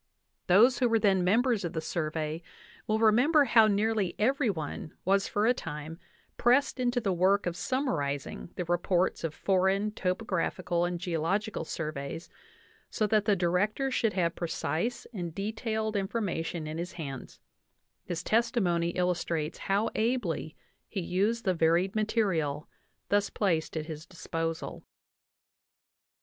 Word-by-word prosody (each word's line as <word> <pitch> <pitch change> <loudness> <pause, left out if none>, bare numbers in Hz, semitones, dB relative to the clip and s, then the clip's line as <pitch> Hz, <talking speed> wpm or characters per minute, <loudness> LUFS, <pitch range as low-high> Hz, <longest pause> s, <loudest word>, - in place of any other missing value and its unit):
) - - -51
Those 225 +8 +6
who 245 -2 +3
were 225 - +4
then 195 -4 +3
members 225 +3 +2
of 170 0 -3
the 160 - -1
Survey 155 0 -3 0.5
will 215 - +2
remember 250 +8 +5
how 225 -3 +6
nearly 210 -3 +1
every 260 +3 +2
one 155 -4 -5
was 195 +1 +3
for 205 +1 0
a 245 - +5
time 160 -4 -7 0.4
pressed 255 +3 +3
into 245 0 +1
the 200 -5 0
work 190 +3 +3
of 175 -1 -2
summarizing 170 - -2
the 180 - -3
reports 175 +1 +1
of 160 -2 -3
foreign 195 +2 +1
topographical 185 -3 -1
and 175 0 -2
geological 180 +4 -1
surveys, 155 0 -5 0.6
so 215 - 0
that 210 0 +2
the 205 - +4
Director 195 +9 +1
should 225 -4 +1
have 170 -3 +1
precise 170 +6 -2
and 175 -5 -5
detailed 220 +1 -2
information 190 -5 -2
in 155 +1 -5
his 175 +2 -4
hands; 140 -6 -7 0.6
his 170 -1 -4
testimony 190 -7 +1
illustrates 170 -3 -1
how 200 +3 0
ably 220 -9 -1 0.3
he 200 - -3
used 205 +7 0
the 185 - +3
varied 170 +3 +2
material 185 -10 0 0.4
thus 205 0 +2
placed 165 -6 0
at 155 - -3
his 155 0 -8
disposal. 165 -2 -4
185 Hz, 140 wpm, -29 LUFS, 165-220 Hz, 0.6 s, Those